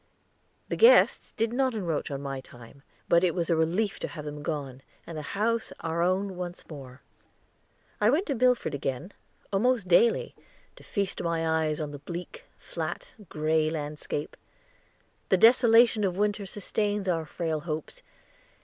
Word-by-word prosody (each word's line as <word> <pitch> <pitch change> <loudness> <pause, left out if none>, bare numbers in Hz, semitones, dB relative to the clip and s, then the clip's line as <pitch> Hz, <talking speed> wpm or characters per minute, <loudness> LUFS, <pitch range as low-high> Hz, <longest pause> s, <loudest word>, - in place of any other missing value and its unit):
The - - -1
guests 470 +2 +5
did 225 0 -1
not 260 -1 +1
encroach 170 -7 -2
on 140 -1 -5
my 135 -1 -4
time, 120 +2 -15 0.3
but 170 +1 +4
it 175 -3 +2
was 170 -2 -1
a - - +4
relief 175 +6 0
to - - -3
have 150 -2 -8
them 150 0 -6
gone 140 -4 -4 0.2
and 165 - -8
the 155 - -4 0.2
house 230 +2 0
our 165 +1 -2
own 185 +2 0
once 175 0 -7
more. 135 -5 -11 1.0
I 210 - +4
went 310 - +2
to 285 - -1
Milford 250 - +2
again, 135 +5 -3 0.4
almost 230 0 +2
daily, 220 +6 +3 0.4
to - - -15
feast 200 -3 -2
my 165 -1 -1
eyes 160 -1 0
on 150 -2 -4
the 145 - -8
bleak, 170 +4 -8
flat, 165 0 -5 0.2
gray 155 0 +1
landscape. 150 -1 -4 0.9
The 190 - +4
desolation 230 0 +6
of 185 -2 0
winter 205 -1 0
sustains 205 +1 -2
our 165 -3 0
frail 160 -1 -2
hopes. 155 - -6
170 Hz, 160 wpm, -28 LUFS, 155-210 Hz, 1.0 s, desolation